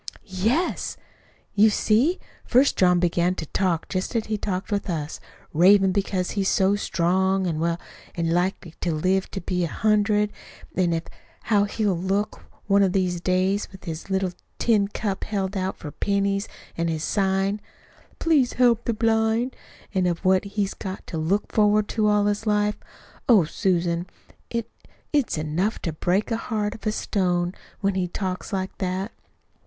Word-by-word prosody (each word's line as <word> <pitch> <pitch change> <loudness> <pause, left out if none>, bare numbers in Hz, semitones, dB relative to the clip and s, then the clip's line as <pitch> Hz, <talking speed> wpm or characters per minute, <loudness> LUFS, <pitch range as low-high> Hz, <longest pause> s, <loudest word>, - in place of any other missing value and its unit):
"Yes. 220 - 0 0.6
You 210 +2 +6
see, 235 - +2 0.3
first 260 +4 +4
John 180 -1 +4
began 175 +1 +1
to 160 - -4
talk 175 0 0
just 185 +6 -3
as 225 - +1
he 220 - -1
talks 195 -2 -3
to 200 -2 -1
us 155 -2 -4 0.3
ravin' 190 +4 +6
because 190 -1 -1
he's 195 -2 0
so 195 0 +3
strong 190 0 +1
an' 165 -3 -1
well, 170 +1 0 0.4
an' 165 -1 0
likely 175 -1 -1
to 175 - 0
live 185 +4 +1
to 195 - -5
be 180 0 -1
a - - +1
hundred; 210 +2 +2 0.4
an' 180 -2 +2
of 165 0 -1 0.4
how 205 -3 +3
he'll 205 -1 0
look, 195 +4 -1 0.2
one 200 0 +4
of 190 -2 +3
these 180 -3 0
days, 185 +3 +1
with 190 - -13
his 165 +1 -6
little 190 -1 0 0.3
tin 210 -4 +3
cup 200 -1 -3
held 200 -2 -2
out 190 0 -2
for 150 - -7
pennies 200 +1 0 0.3
an' 170 0 -1
his 160 -1 -2
sign, 195 +1 +1 0.6
'Please 300 -7 +3
Help 240 -2 +3
the 235 - 0
Blind,' 225 +2 +1 0.4
an' 185 -2 +2
of 175 +2 -2
what 185 +1 +4
he's 200 -1 -2
got 190 -1 -6
to 165 - -4
look 185 +7 0
forward 210 -1 +4
to 215 -2 +1
all 210 -1 +3
his 205 +2 -1
life. 210 0 +1 0.5
Oh, 215 -7 +7
Susan, 175 0 0 0.4
it 230 -1 -2 0.5
it's 285 - +1
enough 160 +8 -1
to 165 - -2
break 180 +6 +1
the 225 - +1
heart 215 -3 -2
of 220 - -7
a - - +3
stone, 180 -4 0 0.3
when 200 -1 +1
he 185 -1 0
talks 185 +2 -4
like 190 -1 -2
that." 190 +3 -2
195 Hz, 170 wpm, -24 LUFS, 180-210 Hz, 0.6 s, Oh